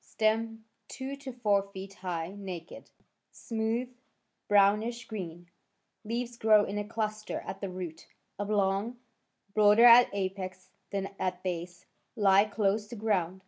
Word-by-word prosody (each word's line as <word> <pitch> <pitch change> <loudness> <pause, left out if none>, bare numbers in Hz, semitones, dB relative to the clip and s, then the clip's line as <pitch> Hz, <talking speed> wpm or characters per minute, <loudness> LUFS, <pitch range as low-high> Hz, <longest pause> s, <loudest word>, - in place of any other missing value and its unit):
Stem 225 0 -1 0.2
two 270 +1 -6
to 275 -1 -7
four 210 -5 +2
feet 195 +1 -8
high— 180 -2 -4
naked, 185 -4 -8 0.4
smooth 230 +1 -2 0.6
—brownish 210 +4 +3
green. 175 -6 -7 0.5
Leaves 235 +2 -3
grow 215 -1 +5
in 205 +1 -3
a - - -1
cluster 215 -1 -3
at 190 +1 -7
the 195 - -3
root— 180 -3 -7 0.3
oblong 205 +3 0 0.6
—broader 210 +2 +6
at 240 +1 +9
apex 185 -1 -4 0.2
than 195 -1 -3
at 185 0 -2
base— 175 -1 -5 0.3
he 200 -2 +5
close 210 0 0
to 235 - -8
ground. 190 -5 0
205 Hz, 130 wpm, -30 LUFS, 190-225 Hz, 0.6 s, at